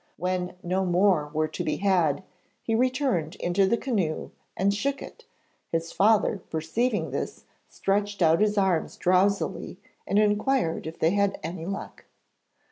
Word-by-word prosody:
When 180 +1 -2
no 185 +2 0
more 180 -4 +2
were 155 0 0
to 175 - -4
be 155 - -1
had, 180 -6 +1 0.4
he 225 - -1
returned 250 - +1
into 190 +2 +1
the 235 - +2
canoe 195 - -2 0.3
and 195 +2 +2
shook 275 +7 -1
it; 475 - -11 0.5
his 165 0 -2
father 210 -1 +3
perceiving 165 - -1
this, 140 - -4 0.3
stretched 200 -1 -1
out 165 +3 +4
his 210 0 +2
arms 190 -5 +1
drowsily 190 +2 +1 0.3
and 200 - +1
inquired 210 - +1
if 160 - -7
they 160 - +2
had 200 0 +2
had - - -9
any 165 +1 -5
luck. 195 +1 -6
190 Hz, 150 wpm, -26 LUFS, 165-205 Hz, 0.5 s, out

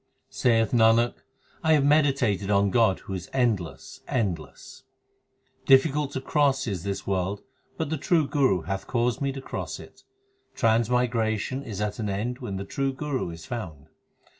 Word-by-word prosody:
6 - - -19
Saith 115 -3 +2
Nanak, 115 0 +4 0.5
I 160 0 +4
have 145 -3 +3
meditated 135 -10 +2
on 100 -1 +3
God 110 -5 +3
who 95 - -7
is 90 -1 -6
endless, 110 -10 -1
endless. 85 - -3 0.9
Difficult 140 +1 +4
to 130 - -3
cross 135 -1 +1
is 100 -7 -3
this 100 +2 -4
world, 95 +1 -2 0.3
but 160 -2 -3
the 160 - 0
true 155 +1 +2
Guru 135 - +2
hath 95 +2 -4
caused 120 +1 0
me 140 -1 0
to 135 0 -7
cross - - -5
it. - - -14 0.5
Transmigration 115 +1 +1
is 105 -7 -6
at 105 +2 -2
an 105 -2 -2
end 115 +6 -3
when 105 -7 -5
the 100 +1 -4
true 135 +6 -1
Guru 135 - -3
is 80 -1 -9
found. 80 -11 -7
115 Hz, 165 wpm, -26 LUFS, 100-135 Hz, 0.9 s, Nanak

